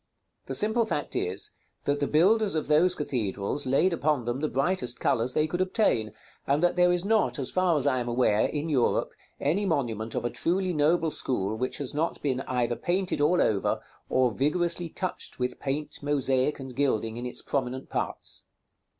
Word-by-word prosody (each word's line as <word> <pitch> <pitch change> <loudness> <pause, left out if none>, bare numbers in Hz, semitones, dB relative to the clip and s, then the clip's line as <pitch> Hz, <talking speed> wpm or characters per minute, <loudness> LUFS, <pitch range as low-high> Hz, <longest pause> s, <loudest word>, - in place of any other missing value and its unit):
The - - -2
simple 220 +2 +2
fact 145 - -3
is, 90 +2 -2 0.3
that 145 0 0
the 145 - 0
builders 195 +5 +3
of 155 - 0
those 165 +5 +4
cathedrals 120 -1 -2
laid 160 +8 +3
upon 150 -5 +1
them 120 +2 -2
the 155 +1 -1
brightest 135 -3 0
colors 120 +2 0
they 155 - +3
could 175 +3 -2
obtain, 185 - +1 0.4
and 145 +4 +2
that 175 - +3
there 180 0 +4
is 180 +1 +1
not, 220 -3 +2
as 135 -2 -1
far 185 -3 +2
as 140 - -1
I 130 -3 +2
am 120 - -3
aware, 120 -3 +2
in 150 +1 -3
Europe, 135 -6 +1 0.3
any 170 +9 +1
monument 115 - -1
of - - -2
a 120 - -1
truly 185 +1 0
noble 160 +2 +2
school 110 -8 -2
which 130 +3 -2
has 140 -3 -4
not 160 +3 -1
been 135 -3 0
either 120 -2 0
painted 180 0 -1
all 165 +5 +3
over, 100 -3 +1 0.3
or 130 -2 +3
vigorously 170 +6 0
touched 185 +3 -4
with 125 0 -2
paint, 145 +2 -4
mosaic, 140 -1 +1
and 130 -2 -8
gilding 115 -5 0
in 120 +1 -4
its 125 - -6
prominent 130 -1 -2
parts. - - -4
145 Hz, 185 wpm, -27 LUFS, 125-175 Hz, 0.4 s, those